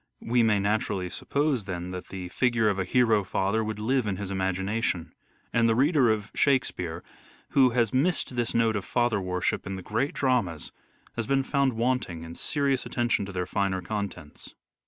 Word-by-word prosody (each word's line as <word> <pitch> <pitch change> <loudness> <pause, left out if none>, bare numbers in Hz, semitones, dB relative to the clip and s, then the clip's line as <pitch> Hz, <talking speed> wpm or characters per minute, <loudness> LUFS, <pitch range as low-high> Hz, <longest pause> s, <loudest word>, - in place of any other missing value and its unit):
We 120 +1 +2
may 110 -3 +3
naturally 100 -3 -1
suppose, 140 -6 0
then, 90 -2 -5
that 90 0 -6
the 90 -2 -6
figure 120 +1 +2
of 100 -1 -1
a 95 - 0
hero 115 0 +3
father 100 +4 0
would 110 -1 -3
live 120 +2 0
in 95 -2 -1
his 100 -1 -5
imagination; 95 -2 -1 0.4
and 115 0 +3
the 115 - +3
reader 140 -1 +4
of 110 -1 -1
" - - -21
Shakespeare 90 - 0 0.2
" - - -28
who 130 -2 +5
has 120 -2 +1
missed 140 -1 +1
this 120 -1 -1
note 115 -1 +3
of 100 - -2
father 120 -3 +1
worship 90 0 -1
in 95 - -3
the 95 - -7
great 115 +9 -1
dramas 120 - 0 0.5
has 115 -2 -2
been 135 0 +2
found 140 -1 +1
wanting 115 -8 -1
in 85 0 -8
serious 140 - 0
attention 120 -5 0
to - - -6
their 90 -1 -2
finer 95 0 -1
contents. 95 -6 -6
110 Hz, 190 wpm, -27 LUFS, 95-125 Hz, 0.5 s, who